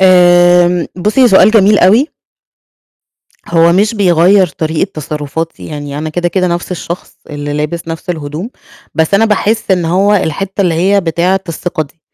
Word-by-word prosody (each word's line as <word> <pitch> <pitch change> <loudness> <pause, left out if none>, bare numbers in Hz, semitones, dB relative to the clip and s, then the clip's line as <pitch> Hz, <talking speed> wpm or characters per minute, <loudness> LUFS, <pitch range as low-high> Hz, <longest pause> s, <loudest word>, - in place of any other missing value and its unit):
آمم، 175 -1 +4 0.2
بُصّي، 215 +7 +2
هو 250 - +6
سؤال 195 -1 +5
جميل 210 -1 +4
أوي. 220 +11 +4 1.4
هو 170 0 +3
مش 210 +5 +1
بيغيّر 185 -1 +3
طريقة 160 +4 -3
تصرفاتي، 155 +2 -5
يعني 145 -1 -7
أنا 155 - -4
كده، 175 +2 -1
كده 185 0 -1
نفس 175 +1 -3
الشخص 175 0 -7
اللي 145 0 -5
لابس 150 +3 -4
نفس 165 +3 -5
الهدوم، 155 +6 -6 0.4
بس 160 +3 +1
أنا 220 +3 +4
باحس 215 0 -1
إن 180 -3 +1
هو 195 +5 +2
الحتة 195 +2 -2
اللي 175 -4 +1
هي 195 +4 +2
بتاعة 180 +2 0
الثقة 165 0 -3
دي، 155 +3 -16
175 Hz, 160 wpm, -12 LUFS, 160-195 Hz, 1.4 s, هو